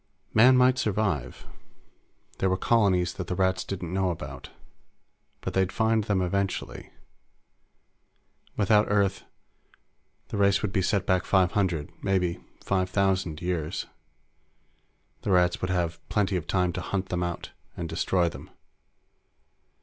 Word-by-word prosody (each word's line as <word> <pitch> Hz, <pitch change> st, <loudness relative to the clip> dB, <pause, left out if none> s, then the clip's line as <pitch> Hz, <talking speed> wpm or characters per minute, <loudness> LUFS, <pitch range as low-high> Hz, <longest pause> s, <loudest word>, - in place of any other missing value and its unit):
Man 125 Hz, +4 st, +7 dB
might 125 Hz, 0 st, +4 dB
survive. 95 Hz, -, -1 dB, 0.9 s
There 95 Hz, -, +2 dB
were 95 Hz, -, +1 dB
colonies 95 Hz, -5 st, +2 dB
that 90 Hz, -, -6 dB
the 90 Hz, -, -2 dB
Rats 95 Hz, -1 st, +1 dB
didn't 90 Hz, -3 st, -5 dB
know 95 Hz, -1 st, +1 dB
about. 70 Hz, -6 st, -6 dB, 0.9 s
But -, -, -4 dB
they'd 95 Hz, 0 st, +1 dB
find 110 Hz, -1 st, +1 dB
them 95 Hz, -3 st, +1 dB
eventually. 95 Hz, +1 st, -3 dB, 1.7 s
Without 105 Hz, +1 st, +4 dB
Earth, 100 Hz, -2 st, +1 dB, 1.0 s
the -, -, -4 dB
race 100 Hz, 0 st, +3 dB
would 100 Hz, -1 st, -2 dB
be 95 Hz, -, +2 dB
set 100 Hz, +1 st, 0 dB
back 95 Hz, -2 st, +2 dB
five 95 Hz, -3 st, +3 dB
hundred 90 Hz, -7 st, -1 dB
maybe 90 Hz, -3 st, 0 dB, 0.2 s
five 95 Hz, -1 st, 0 dB
thousand 95 Hz, -4 st, 0 dB
years. 85 Hz, -2 st, -2 dB, 1.4 s
The -, -, -4 dB
Rats 90 Hz, -2 st, +3 dB
would 90 Hz, -, -2 dB
would 90 Hz, -, 0 dB
have 85 Hz, -2 st, -1 dB
plenty 100 Hz, -2 st, +1 dB
of 90 Hz, -, -3 dB
time 90 Hz, -2 st, +1 dB
to -, -, -4 dB
hunt 95 Hz, -1 st, -3 dB
them 90 Hz, -1 st, -1 dB
out 85 Hz, -1 st, -4 dB, 0.3 s
and 85 Hz, -, -3 dB
destroy 85 Hz, +2 st, +1 dB
them. -, -, -8 dB
95 Hz, 140 wpm, -27 LUFS, 90-100 Hz, 1.7 s, Man